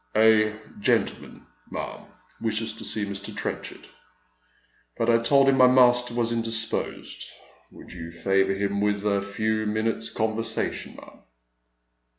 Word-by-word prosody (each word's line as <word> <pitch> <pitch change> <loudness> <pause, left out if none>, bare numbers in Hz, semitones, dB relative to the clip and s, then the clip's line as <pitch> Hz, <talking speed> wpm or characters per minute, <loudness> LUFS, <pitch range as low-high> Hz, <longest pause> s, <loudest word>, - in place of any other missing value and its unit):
"A 110 -1 +5 0.2
gentleman, - - -1 0.2
ma'am, - - -6 0.3
wishes 110 0 -1
to - - -9
see 105 -2 -1
Mr. 100 -1 -6
Trenchard, - - -5 1.1
but 115 +1 +2
I 115 - +4
told 135 +3 +4
him 135 -1 +4
my 130 -1 +7
master 125 -1 +4
was 120 -1 0
indisposed. 115 -1 -3 0.5
Would - - -13
you 85 -2 -8
favour 95 +3 +1
him 100 0 -1
with 105 0 0
a 100 -1 +2
few 110 +2 -1
minutes' 110 +1 -1
conversation, 110 +1 -2
ma'am - - -14
110 Hz, 130 wpm, -25 LUFS, 100-115 Hz, 1.1 s, my